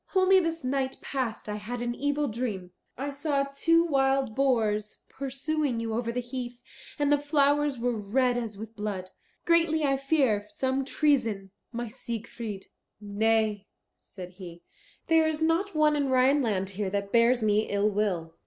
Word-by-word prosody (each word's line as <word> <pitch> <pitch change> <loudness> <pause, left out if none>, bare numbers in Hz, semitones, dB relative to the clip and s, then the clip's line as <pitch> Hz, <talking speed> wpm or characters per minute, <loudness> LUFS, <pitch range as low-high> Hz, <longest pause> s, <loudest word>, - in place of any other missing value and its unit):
Only 380 0 +6
this 330 -3 -2
night 265 0 -1
past 255 -6 -4
I 210 0 -3
had 235 +4 -5
an 240 0 -2
evil 285 +3 -1
dream. 215 -6 -4 0.3
I 280 +3 -3
saw 280 0 0
two 330 +5 +2
wild 270 -5 +1
boars 215 -5 0
pursuing 275 -1 -2
you 225 -1 -3
over 235 +1 -1
the 245 - -2
heath, 245 -1 -6 0.4
and 290 -1 +1
the 290 - +4
flowers 290 -1 +2
were 240 0 -1
red 245 +4 +1
as 225 -4 -4
with 220 +2 -9
blood. 200 -3 -4 0.3
Greatly 330 -2 +3
I 275 -1 +2
fear 270 -7 +1
some 270 -3 -1
treason, 230 -10 +1 0.2
my 240 0 -4
Siegfried." 225 -3 -6 0.3
"Nay," 210 0 0 0.3
said 180 -2 -10
he, 175 -3 -10 0.4
"there 325 -1 +4
is 310 -1 -1
not 330 +4 +1
one 305 -1 +4
in 285 -2 0
Rhineland 255 -7 +2
here 195 0 -3
that 200 0 -3
bears 235 0 +4
me 215 0 +2
ill 205 +1 +1
will. 185 -6 -1
245 Hz, 160 wpm, -28 LUFS, 215-285 Hz, 0.4 s, Only